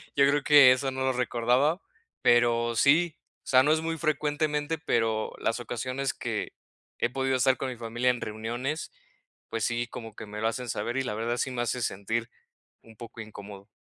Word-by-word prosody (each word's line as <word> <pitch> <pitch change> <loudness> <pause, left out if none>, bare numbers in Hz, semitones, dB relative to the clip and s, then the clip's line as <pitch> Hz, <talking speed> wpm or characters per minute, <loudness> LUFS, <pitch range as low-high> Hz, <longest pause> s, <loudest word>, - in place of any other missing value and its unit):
yo 140 0 +5
creo 145 0 +1
que 145 -3 +8
eso 135 +1 +1
no 130 0 -5
lo 130 0 +1
recordaba, 125 +7 +1 0.4
pero 120 -1 +3
sí, 160 +6 +3 0.3
o - - -23
sea, 130 0 +5
no 150 - +3
es 160 - 0
muy 165 0 -2
frecuentemente, 150 0 -1
pero 115 -8 0
las 115 - -1
ocasiones 130 +3 -3
que - - -4 0.5
he 120 - +1
podido 135 +1 0
estar 130 0 +3
con 135 - -3
mi 125 - -7
familia 120 +2 -1
en 125 - -5
reuniones, 120 +8 -4 0.6
pues 115 -2 -3
sí, 120 0 -1
como 115 -2 -9
que 110 - -8
me 105 +1 -7
lo 110 - +2
hacen 125 +2 -5
saber 115 +4 -2
y 135 - +1
la 125 - -3
verdad, 115 +2 -2
sí 130 - -1
me 125 -1 -2
hace 125 +1 -2
sentir 110 +4 -2 0.5
un 115 -1 -17
poco 115 0 -10
incómodo. 100 -2 -10
125 Hz, 195 wpm, -28 LUFS, 115-140 Hz, 0.6 s, que